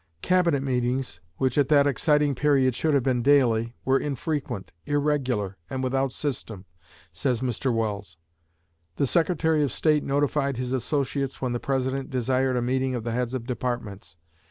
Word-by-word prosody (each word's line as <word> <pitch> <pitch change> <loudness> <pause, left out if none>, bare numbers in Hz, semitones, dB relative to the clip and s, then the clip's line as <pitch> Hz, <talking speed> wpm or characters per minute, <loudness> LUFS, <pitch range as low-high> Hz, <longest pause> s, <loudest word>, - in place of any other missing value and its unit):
"Cabinet 175 -6 +2
meetings, 125 -5 -1 0.2
which 130 +1 +1
at 140 - +3
that 145 -1 +5
exciting 150 +1 +2
period 135 -1 +2
should 150 +4 +1
have 135 - +2
been 125 -2 +1
daily, 120 -4 +3
were 135 +1 +3
infrequent, 135 - -3 0.2
irregular, 135 -9 0
and 130 0 -3
without 135 +1 0
system," 115 -9 -4 0.5
says 115 +8 -1
Mr. 130 +1 -1
Welles. 105 -6 -3 0.8
"The - - +1
Secretary 160 +1 +2
of 145 - +1
State 150 -2 +2
notified 140 -1 0
his 125 0 -3
associates 135 +1 -1
when 125 -2 -2
the 120 - -2
President 135 0 -2
desired 130 0 0
a 120 - 0
meeting 130 +1 0
of 120 - -4
the 115 - -3
heads 125 +1 -1
of 120 -3 -4
Departments. 120 -7 -4
130 Hz, 155 wpm, -25 LUFS, 120-140 Hz, 0.8 s, that